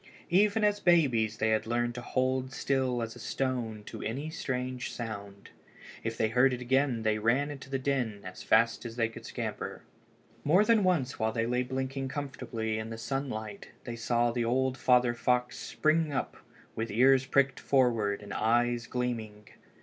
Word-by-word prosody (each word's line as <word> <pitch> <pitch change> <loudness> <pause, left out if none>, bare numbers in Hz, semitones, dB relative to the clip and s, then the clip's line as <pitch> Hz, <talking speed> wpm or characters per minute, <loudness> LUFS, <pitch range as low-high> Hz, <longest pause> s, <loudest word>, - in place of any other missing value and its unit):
_] - - -33 0.3
Even 205 +4 +4
as 205 0 +3
babies 125 - +3
they 110 -1 +1
had 110 0 +1
learned 120 +1 0
to 125 - -6
hold 130 +1 -1
still 130 -3 0
as 115 +1 -6
a - - -11
stone 115 -3 -2
at - - -6
any 140 +8 -3
strange 125 -4 -3
sound. 100 -4 -7 0.5
If 115 0 -3
they 110 - +1
heard 125 +3 +4
it 125 - -3
again 130 -1 +1
they 110 -1 +1
ran 135 +7 +1
to 130 - -12
the 135 - 0
den 130 -6 -1
as 95 0 -8
fast 115 +1 +3
as 115 -2 -7
they 115 -2 +1
could 115 - -10
scamper. - - -5 0.6
More 180 +8 +4
than 225 -2 +4
once 160 -9 +1
while 110 0 +1
they 115 0 -1
lay 125 +1 +1
blinking 130 +1 -3
comfortably 120 -6 -4
in 110 0 -5
the 115 - -6
sunlight 115 -5 -4
they 120 - -5
saw 120 +1 +1
the 120 0 -1
old 130 +2 +1
father 125 -1 +3
fox 125 +1 0
spring 155 0 +1
up 135 - -2 0.4
with 110 +1 -3
his 105 - -5
ears 135 +1 +5
pricked 140 -1 +2
forward 115 -7 +1
and 100 -1 -7
his - - -3
eyes 120 +2 +2
gleaming. 110 -4 -4
125 Hz, 185 wpm, -30 LUFS, 115-135 Hz, 0.6 s, ears